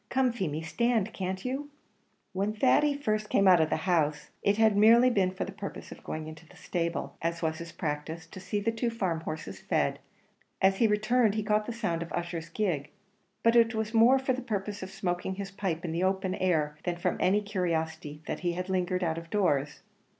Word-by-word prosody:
Come, 260 -1 +2
Feemy, 165 -9 -3
stand, 220 +5 0
can't 185 +1 -4
you?" 270 +3 -3 0.6
When 200 +3 -1
Thady 275 +6 +3
had 285 0 -9
first 215 -2 0
come 195 - +3
out 180 -3 +7
of 160 - +2
the - - +1
house, 155 -5 +1
it 200 +1 +2
had 220 -2 +4
merely 230 +4 +6
been 195 -5 +2
for 185 - -4
the - - -7
purpose - - -7
of - - -11
going 155 0 -5
into 155 +1 -10
the - - -18
stable, 170 -1 -3
as 170 +1 -2
was 160 -1 -1
his 170 0 -7
practice, 160 +1 -4
to 165 - -11
see 205 +2 -2
the 215 +3 0
two 230 +1 -1
farm 190 -8 -1
horses 155 -1 -6
fed; - - 0 0.6
as 190 0 +4
he 230 - +4
returned, 215 +1 +2
he 215 - -1
caught 210 0 +1
the - - -2
sound 200 -8 -2
of 170 - -6
Ussher's 170 -1 -3
gig; 170 -9 -1 0.5
but 230 +1 +4
it 230 -1 +5
was 220 0 -2
more 235 +4 +6
for 265 0 0
the 255 - -3
purpose 205 -3 -3
of 190 - -6
smoking 180 +1 -2
his 195 0 -5
pipe 185 -4 -3
in 165 - -2
the 170 +3 -1
open 190 0 0
air 155 -6 0
than 175 -1 -1
from 175 - -1
any 190 +3 +3
curiosity 160 -6 -2
that - - -3
he 175 -1 -2
lingered 185 0 -1
out 165 -1 0
of 165 0 -13
doors. 145 -8 0
190 Hz, 215 wpm, -29 LUFS, 165-215 Hz, 0.6 s, out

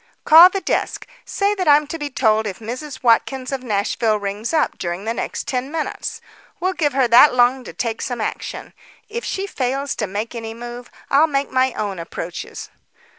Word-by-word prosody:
"Call 330 +4 +9
the 390 +1 -3
desk. - - -2 0.2
Say 400 +1 0
that 375 -4 -3
I'm 295 +1 +6
to 325 +3 -6
be 295 -1 -3
told 220 -4 +2
if 190 - -5
Mrs. 255 +5 -7
Watkins 255 +2 +2
of 270 -1 -3
Nashville 215 -1 0
rings 205 +2 -4
up 320 - 0
during 175 +3 -4
the 225 - -1
next - - -4
ten 260 +2 -2
minutes. 320 -1 -4 0.4
We'll 370 +2 0
give 295 -6 0
her 265 -2 +3
that 250 +3 +7
long 250 +1 +3
to - - -7
take 230 -2 -3
some 245 -2 -3
action. 215 - -5 0.4
If 470 +2 -4
she 390 - -3
fails 275 -5 -2
to 210 - -1
make 210 +5 -4
any 225 -1 -6
move, 240 +1 -8 0.2
I'll 290 +3 +5
make 280 -2 -1
my 260 0 +2
own 200 -4 -3
approaches." 170 +1 -7
255 Hz, 190 wpm, -20 LUFS, 225-295 Hz, 0.4 s, Call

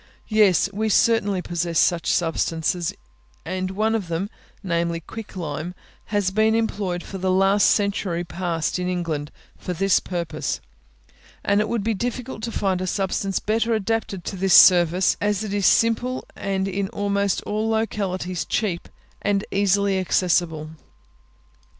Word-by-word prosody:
Yes: 210 -5 +4
we 215 +2 -1
certainly 205 -4 +2
possess 170 -1 -2
such 170 +1 +2
substances, 165 0 0 0.5
and 185 +2 -2
one 215 +4 0
of 215 -5 -1
them, 170 +5 -3 0.3
namely, 170 -2 -1
quick 220 +6 -9
lime, 165 0 -4 0.3
has 205 -3 0
been 220 +2 +3
employed 200 -6 -1
for 195 - -7
the 185 +1 0
last 195 +2 +4
century 200 -4 0
past 170 -1 -2
in 180 0 -1
England 165 -5 -2 0.3
for 180 - -4
this 195 +2 +3
purpose; 175 -2 -3 0.9
and 200 +1 +3
it 215 - -2
would 230 -4 -1
be 225 +1 +1
difficult 245 +2 -4
to 230 +1 -3
find 190 -4 0
a 185 - -2
substance 195 0 -1
better 225 +2 +1
adapted 215 -3 -2
to - - -4
this 190 0 +3
service, 180 0 +6
as 205 0 0
it 205 -2 -4
is 200 -3 +2
simple, 230 +3 +2
and 195 -1 -2
in 195 0 -2
almost 200 -1 0
all 215 +1 -1
localities 190 -5 -1
cheap 190 -6 -2 0.3
and 200 -1 0
easily 200 0 +2
accessible. 170 -4 0
195 Hz, 145 wpm, -23 LUFS, 175-210 Hz, 0.9 s, service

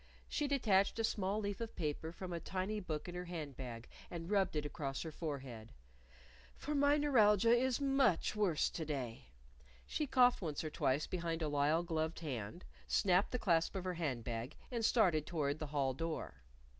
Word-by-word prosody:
She 295 - -1
detached 215 -9 +3
a 225 - 0
small 205 -1 0
leaf 205 0 -3
of 230 -1 -5
paper 160 0 -3
from 180 +1 -6
a 170 - -2
tiny 190 +5 -2
book 155 -5 -4
in 175 - -6
her 180 0 -4
hand 160 -6 -5
bag 120 -3 -7 0.2
and 170 +2 -6
rubbed 195 -5 +2
it 150 -1 -1
across 140 -2 -3
her 160 - -5
forehead. 135 -8 -6 0.8
"For 300 - -4
my 285 0 +4
neuralgia 230 -6 +5
is 255 0 +1
much 270 - +2
worse 195 -7 +2
to 165 - -4
day." 130 - -4 0.6
She 300 - -2
coughed 250 -3 +5
once 155 -4 -3
or 155 - -4
twice 140 0 +1
behind 165 -2 -2
a - - 0
lisle 145 +3 +2
gloved 160 -1 -2
hand, 135 - -5 0.2
snapped 190 -1 +3
the 250 - -1
clasp 170 -5 +2
of 190 - -2
her 185 -1 -2
hand 145 -9 -2
bag 120 +4 -4 0.2
and 235 -2 -2
started 185 -10 +3
toward 150 -3 -1
the 155 - -3
hall 140 -2 0
door. 155 - -4
170 Hz, 185 wpm, -36 LUFS, 150-210 Hz, 0.8 s, neuralgia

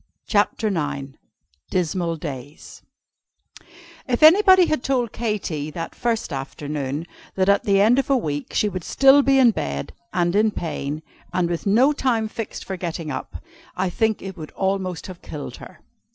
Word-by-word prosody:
CHAPTER 210 +1 +1
IX 145 -7 -2 0.6
DISMAL 175 -1 -1
DAYS 145 -1 -8 1.3
If 250 +2 0
anybody 375 +2 +8
had 310 -6 -1
told 250 -4 0
Katy, 195 -10 -3
that 165 +2 -6
first 230 -9 -2
afternoon, 140 +2 -4 0.3
that 190 0 +1
at 200 +3 +3
the 200 -2 +3
end 225 +6 +5
of 275 - -2
a 275 - +4
week 145 - -3
she 210 - +1
would 185 -4 -4
still 275 +7 +5
be 275 0 +3
in 250 -3 +6
bed, 70 - -4 0.2
and 175 0 +1
in 215 +1 +4
pain, 155 -5 -4 0.3
and 180 -2 +1
with 170 +3 -3
no 250 +9 +4
time 235 -6 0
fixed 220 0 -6
for 190 - -4
getting 165 -3 -4
up, 130 - -6 0.3
I 185 -1 0
think 220 +2 0
it 190 -1 -6
would 155 -2 -7
have - - -24
almost 190 -2 -1
killed 150 -2 -7
her. - - -13
190 Hz, 165 wpm, -22 LUFS, 155-230 Hz, 1.3 s, anybody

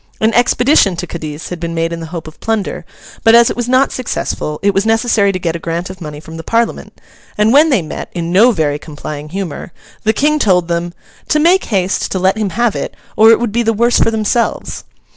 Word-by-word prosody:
An 220 +1 +2
expedition 245 - +3
to 175 - -4
Cadiz 155 -2 -7
had 180 - -6
been 170 0 -4
made 165 0 -1
in 165 - -5
the 165 - -7
hope 165 -1 -7
of 155 - -12
plunder, 220 -3 -2 0.4
but 225 0 +6
as 235 0 +6
it - - -4
was 240 0 -3
not 260 +2 +3
successful, 150 -10 -3
it 200 0 +3
was 195 +1 +1
necessary 225 -2 +2
to 185 - -3
get 170 -2 -2
a - - -4
grant 170 +2 -4
of 185 -1 -13
money 150 -2 -7
from 160 +1 -10
the 165 - -7
Parliament; 230 +3 -2 0.4
and 210 +2 +3
when 305 +3 +6
they 255 - +2
met, 155 - -7
in 170 -1 -3
no 210 +7 +6
very 150 -7 -1
complying 150 0 -8
humour, 185 -1 -5 0.3
the 220 - +3
King 300 +7 +1
told 180 - +2
them, 170 0 -3 0.3
'to - - +2
make 350 +5 +3
haste 190 -3 -1
to - - -1
let 190 +1 +2
him 215 -2 -1
have 235 +3 0
it, - - -4 0.2
or 220 +1 +6
it 225 - +6
would 235 -2 -1
be 235 +3 0
the 225 -1 +1
worse 235 +3 +2
for - - +3
themselves. 220 +1 -1
195 Hz, 235 wpm, -15 LUFS, 170-230 Hz, 0.4 s, but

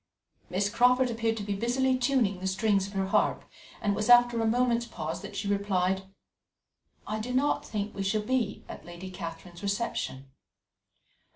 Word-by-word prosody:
Miss 190 +3 +1
Crawford 245 +3 +3
appeared 225 -1 -1
to 210 - -4
be 200 0 -2
busily 250 +5 +1
tuning 245 -7 +1
the 190 - -3
strings 195 0 +1
of 200 - -11
her 195 -1 0
harp, 190 - +1 0.4
and 205 -1 +1
it - - -2
was 210 +3 -2
after 240 -1 +6
a 225 - +1
moment's 235 0 +2
pause 160 -2 -5
that 200 - -9
she 205 - -3
replied: 190 -1 0 0.9
"I 215 +1 -3
do 235 +3 -4
not 270 +3 +1
think 205 -1 -4
we 195 - -5
shall 210 +2 0
be 235 -3 -1
at - - -9
Lady 175 +2 -9
Catherine's 175 0 -8
reception." 200 - -3
205 Hz, 175 wpm, -29 LUFS, 190-235 Hz, 0.9 s, after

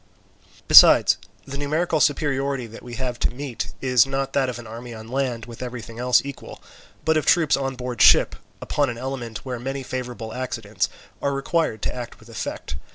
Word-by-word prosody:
Besides, - - +8 0.3
the 140 +1 -6
numerical 155 +3 0
superiority 140 -3 +1
that 115 0 -11
we 120 -1 -8
have 125 -1 -3
to - - +1
meet 125 -2 -5
is 130 -1 +4
not 135 0 -2
that 135 -2 +2
of 120 - -5
an 120 - -9
army 115 +1 -8
on 110 0 -10
land 125 -4 -2
with 120 0 -11
everything 120 -2 -7
else 125 0 +3
equal, 140 -1 -8 0.5
but 160 0 +3
of 155 - -1
troops 160 -5 +4
on 135 -1 -2
board 125 -2 -4
ship, - - +6 0.3
upon 145 -2 0
an 120 - -5
element 120 -3 -5
where 125 -2 -4
many 135 +2 -4
favourable 125 -3 -5
accidents 115 -6 -2 0.3
are 140 - 0
required 140 -5 -1
to - - -1
act 120 -2 -7
with 110 - -17
effect. 115 - -5
125 Hz, 185 wpm, -23 LUFS, 120-135 Hz, 0.5 s, Besides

